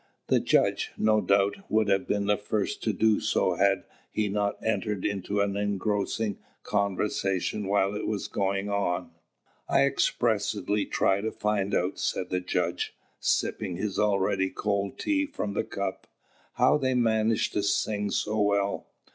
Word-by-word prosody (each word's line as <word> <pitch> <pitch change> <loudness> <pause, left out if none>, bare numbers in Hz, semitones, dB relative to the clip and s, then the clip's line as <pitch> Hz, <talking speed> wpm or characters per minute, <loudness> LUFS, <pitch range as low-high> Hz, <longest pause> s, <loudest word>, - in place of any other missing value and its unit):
The - - +4
judge, - - +1
no 110 0 +3
doubt, 100 +1 +2
would 110 -1 +2
have 95 -1 +1
been 100 -1 0
the 105 +1 +3
first 105 0 -2
to 110 - +3
do 110 +2 +3
so 95 - +1
had 95 +3 +2 0.3
he 105 -1 0
not 100 0 0
entered 105 -2 -1
into 100 0 -1
an 100 -1 0
engrossing 105 +1 -1 0.2
conversation 100 0 -1
while 100 0 +2
it 105 - -3
was 105 -2 -2
going 95 0 -1
on. 90 -4 -1 0.6
"I - - +4
expressly 105 0 0
tried 95 +1 +2
to 110 +1 -2
find 105 -2 0
out," 90 +2 0
said 90 - -2
the 90 - +1
judge, 90 - -2 0.2
sipping 95 -5 0
his 100 +1 -2
already 100 -2 +2
cold 100 -1 -2
tea 295 -1 0
from 105 - -4
the - - 0
cup, 100 -1 -4 0.5
"how - - +4
they 130 -2 +1
manage 110 -2 +2
to 105 - 0
sing 105 0 0
so 105 +2 0
well. 100 -1 +1
100 Hz, 155 wpm, -27 LUFS, 100-105 Hz, 0.6 s, The